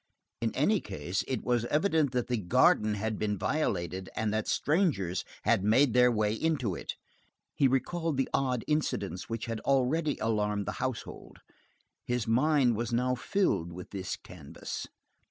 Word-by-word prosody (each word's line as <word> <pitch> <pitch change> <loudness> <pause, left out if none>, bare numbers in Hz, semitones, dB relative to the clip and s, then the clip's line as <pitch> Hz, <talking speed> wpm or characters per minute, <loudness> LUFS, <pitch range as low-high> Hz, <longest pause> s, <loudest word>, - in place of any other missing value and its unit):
In 115 -1 0
any 200 +10 +3
case, 95 -2 -3
it 130 -4 -2
was 120 -2 +1
evident 155 0 +2
that 125 -2 0
the 125 - -1
garden 105 +2 +3
had 110 +1 -2
been 105 -1 0
violated, 95 - -1
and 110 -1 -1
that 110 0 -1
strangers 145 - +1 0.2
had 95 - +3
made 115 +5 +4
their 125 0 +5
way 105 -2 +1
into 130 - 0
it. - - -5 0.6
He 140 - +3
recalled 160 +4 0
the 135 - +1
odd 125 -3 +1
incidents 100 - -1
which 115 0 -3
had 115 -2 -3
already 140 +4 +1
alarmed 105 -2 0
the - - -5
household. 130 -3 -5 0.7
His 125 -3 -1
mind 130 +1 +3
was 115 +1 -2
now 125 +2 +1
filling 120 - 0
in 90 - -6
this 95 -2 -3
canvas. - - -8
120 Hz, 155 wpm, -30 LUFS, 105-140 Hz, 0.7 s, their